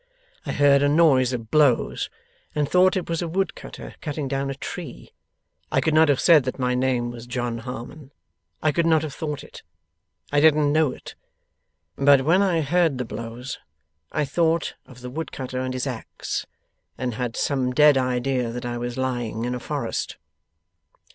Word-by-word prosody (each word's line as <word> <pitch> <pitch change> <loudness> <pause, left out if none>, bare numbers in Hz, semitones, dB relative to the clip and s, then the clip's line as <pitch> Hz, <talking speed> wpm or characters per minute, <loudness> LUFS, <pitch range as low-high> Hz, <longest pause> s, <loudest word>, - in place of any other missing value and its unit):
I - - -1
heard 140 -1 +4
a 145 - +3
noise 145 -5 +4
of 115 -3 -5
blows, 145 -6 +2 0.5
and 150 -1 +1
thought 185 +3 +4
it 180 - -3
was 165 0 -2
a 170 - -2
wood 190 +2 -1
cutter - - -10
cutting 150 -2 -3
down 135 0 -2
a 135 - -3
tree. 150 0 -8 0.6
I - - +3
could 160 - +1
not 160 0 +5
have 140 - +3
said 160 -5 +6
that 130 - -3
my 125 -1 0
name 125 -1 0
was 120 0 -10
John 120 -1 -3
Harmon 130 +4 -8 0.5
I 155 - +4
could 165 +2 +1
not 160 -2 +4
have 150 -3 -5
thought 150 -3 -4
it - - -12 0.7
I 145 - +3
didn't 150 -1 +4
know 155 -3 +3
it - - -10 0.8
but 140 -1 +6
when 170 +7 +4
I 180 -5 +2
heard 165 -1 +2
the 125 - -3
blows, 115 +3 -6 0.5
I 150 - 0
thought 165 +3 +1
of 125 -1 -14
the 125 - -6
wood 160 +4 -5
cutter 130 -1 -5
and 130 0 -2
his 130 +1 -2
axe, 125 -5 -5 0.5
and 125 -2 -2
had 120 0 -3
some 130 -3 0
dead 150 +2 +6
idea 125 -1 0
that 120 +1 -5
I 120 0 -3
was 120 +1 -4
lying 120 -3 -2
in 125 - -2
a 125 - -3
forest. - - -3
135 Hz, 185 wpm, -24 LUFS, 125-155 Hz, 0.8 s, said